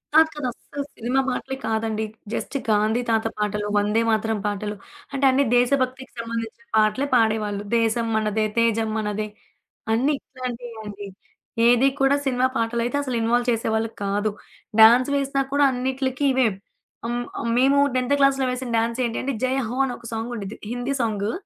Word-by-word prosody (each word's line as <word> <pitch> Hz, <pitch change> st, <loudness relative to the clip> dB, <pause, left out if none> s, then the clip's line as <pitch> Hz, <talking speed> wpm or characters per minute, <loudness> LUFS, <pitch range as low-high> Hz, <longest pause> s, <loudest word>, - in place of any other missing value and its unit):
కాదు. 320 Hz, 0 st, +7 dB
కాదు. 295 Hz, -4 st, -3 dB
అస్సలు 280 Hz, +4 st, -7 dB
సినిమా 245 Hz, +4 st, 0 dB
మాటలే 265 Hz, +1 st, -3 dB
కాదండి. 220 Hz, 0 st, -1 dB, 0.3 s
జస్ట్ -, -, -4 dB
గాంధీ 215 Hz, +3 st, +2 dB
తాత 225 Hz, -1 st, +2 dB
పాటలు, 210 Hz, 0 st, -1 dB
వందేమాతరం 220 Hz, +1 st, +1 dB
పాటలు, 210 Hz, 0 st, -2 dB, 0.4 s
అంటే 275 Hz, 0 st, +1 dB
అన్ని 275 Hz, +2 st, +3 dB
దేశభక్తికి 260 Hz, +1 st, +1 dB
సంబంధించిన 230 Hz, 0 st, -5 dB
పాటలే 215 Hz, +6 st, +2 dB
పాడేవాళ్ళు. 215 Hz, -3 st, +1 dB
'దేశం 230 Hz, 0 st, +1 dB
మనదే 215 Hz, 0 st, +1 dB
తేజం 225 Hz, -1 st, +2 dB
మనదే' 210 Hz, 0 st, -2 dB, 0.6 s
అన్నీ 265 Hz, +6 st, +2 dB
ఇట్లాంటియ్యే 245 Hz, -3 st, -7 dB
అండి. 205 Hz, -1 st, -7 dB, 0.6 s
ఏదీ 245 Hz, +3 st, +5 dB
కూడా 270 Hz, +1 st, +4 dB
సినిమా 255 Hz, -1 st, +2 dB
పాటలైతే 235 Hz, +3 st, -1 dB
అసలిన్‌వాల్వ్ 240 Hz, -1 st, +1 dB
చేసేవాళ్ళు 225 Hz, -1 st, 0 dB
కాదు. 205 Hz, +1 st, 0 dB, 0.5 s
డాన్సులేసినా 275 Hz, +4 st, +5 dB
కూడా 285 Hz, 0 st, +4 dB
అన్నిట్లికి 260 Hz, +2 st, -1 dB
ఇవే. 260 Hz, -2 st, +3 dB, 0.6 s
ఆహ్, 240 Hz, -, -2 dB, 0.2 s
ఆహ్, 235 Hz, -, -2 dB
మేము 275 Hz, +3 st, +4 dB, 0.2 s
10థ్ 255 Hz, +2 st, +2 dB
క్లాస్లో 275 Hz, -1 st, +3 dB
వేసిన 250 Hz, 0 st, -4 dB
డాన్సేంటంటే, 235 Hz, +3 st, -1 dB
'జయహో' 255 Hz, -1 st, -1 dB
అనొక 245 Hz, -2 st, -6 dB
సాంగుడిద్ది, 225 Hz, -2 st, -5 dB
హిందీ 245 Hz, +3 st, -2 dB
సాంగు. 215 Hz, -2 st, -1 dB
235 Hz, 135 wpm, -23 LUFS, 220-260 Hz, 0.6 s, కాదు